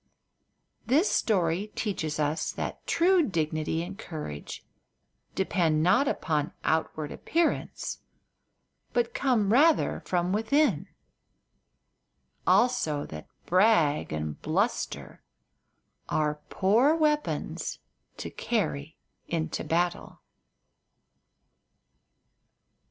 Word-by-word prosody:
This 300 - +3
story 185 -2 +1
teaches 160 -8 -2
us 150 +1 0
that - - -5
true 360 +2 +4
dignity 160 - -1
and 195 +4 -8
courage 150 - -7 0.7
depend 165 -5 +1
not 205 - +4
upon 155 - -1
outward 155 -1 -1
appearance, 335 0 -1 0.9
but 475 0 +1
come 235 - +2
rather 310 +5 +4
from 180 0 0
within; 220 - +2 1.6
also 160 -12 +2
that 75 0 -9 0.2
brag 180 - +3
and 75 -1 -4
bluster 195 +9 -2 0.9
are 150 -1 0
poor 235 +11 +3
weapons 300 -2 -1 0.4
to - - -6
carry 160 -9 -2 0.3
into 160 -1 -2
battle. 175 +1 -1
180 Hz, 80 wpm, -28 LUFS, 155-240 Hz, 1.6 s, true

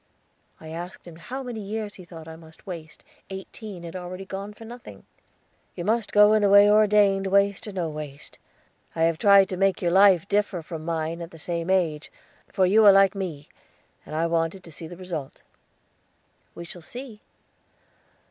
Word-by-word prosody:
I 160 - -11
asked 175 +3 -8
him 170 -2 -12
how 260 +10 -6
many 245 -3 -6
years 210 0 -5
he 185 - -13
thought 165 -2 -11
I 160 - -9
must 160 0 -16
waste; 165 -5 -9 0.3
eighteen 190 0 -9
had 170 +1 -8
already 185 +1 -7
gone 195 +1 -6
for 215 +2 -13
nothing. 240 +2 -11 0.7
"You 175 - -5
must 220 0 0
go 210 +1 +6
in 215 - +3
the 205 - +3
way 200 +1 +8
ordained, 205 -2 +4
waste 200 +1 +2
or - - -5
no 180 -4 -2
waste. 150 -2 -8 0.6
I 165 - +1
have 165 -1 +1
tried 200 -2 +6
to 185 - -4
make 195 0 +2
your 175 -2 0
life 190 -1 +5
differ 200 -4 0
from 160 -1 -7
mine 165 0 -3
at 165 - -7
the 165 - -14
same 170 +2 -4
age, 165 -5 0 0.4
for 190 - +1
you 210 +4 +5
are 200 - +10
like 195 0 +5
me, 170 -7 -5 0.6
and 155 - -8
I 165 +1 +1
wanted 165 +2 -1
to 165 - -12
see 160 +1 -9
the 175 +1 -10
result." 170 -7 -7 1.1
"We 170 - -8
shall 175 +1 -9
see." 240 +4 -9
185 Hz, 185 wpm, -25 LUFS, 165-205 Hz, 1.1 s, are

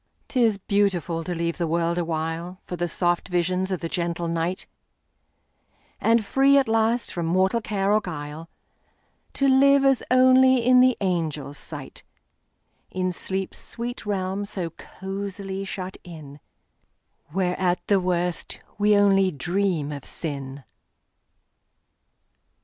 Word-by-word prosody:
'T 250 -2 +2
is 220 -3 +3
beautiful 185 -5 0
to 175 +2 -4
leave 170 +1 -2
the 170 - 0
world 170 +1 0
awhileFor 170 +2 -4
the 175 0 -2
soft 175 0 0
visions 180 +1 0
of 185 -3 -2
the 165 - -2
gentle 170 0 -2
night; 170 +3 -2 1.3
And 230 -1 +3
free, 275 +5 +4
at 275 - +3
last, 225 +2 +1
from 170 -2 -2
mortal 190 +6 +2
care 200 -2 0
or 215 - +3
guile, 160 -2 -7 0.8
To 275 - +1
live 275 +1 +5
as 270 -2 +4
only 255 -1 +5
in 250 0 +6
the 255 -1 +4
angels' 160 -6 -2
sight, - - -6 0.9
In 185 0 -1
sleep's 190 +2 -4
sweet 240 +1 -6
realm 195 -1 -2
so 190 -5 -4
cosily 195 +2 -6
shut 190 -1 -6
in, 155 -5 -11 0.9
Where, 180 +3 -1
at 180 -1 0
the 200 -2 +3
worst, 180 -1 -2 0.2
we 210 0 +4
only 195 -1 +4
dream 175 -1 -1
of 140 -2 -6
sin! 140 -3 -4
185 Hz, 130 wpm, -24 LUFS, 170-205 Hz, 1.3 s, in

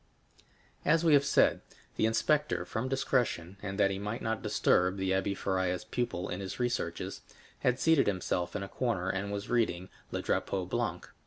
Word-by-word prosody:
As 165 +1 +3
we 160 - +6
have 140 -1 +6
said, 140 - +3 0.3
the 110 - +2
inspector, 150 +7 +1
from 120 +3 -3
discretion, 120 -9 0
and 100 0 -5
that 100 -1 +4
he 95 - -3
might 105 +3 -4
not 110 -1 -1
disturb 90 +2 +2
the 95 0 0
Abbé 95 +1 0
Faria's 95 -1 0
pupil 120 -5 -2
in 90 - -4
his 95 +3 -6
researches, 120 -1 -2 0.4
had 125 +1 +1
seated 160 -2 +4
himself 90 -2 -1
in 100 - -2
a - - -5
corner, 95 -6 -1
and 100 +1 -3
was 100 0 -4
reading 95 -7 0 0.2
Le - - -3
Drapeau 95 -2 0
Blanc. 90 - -2
100 Hz, 175 wpm, -31 LUFS, 95-125 Hz, 0.4 s, we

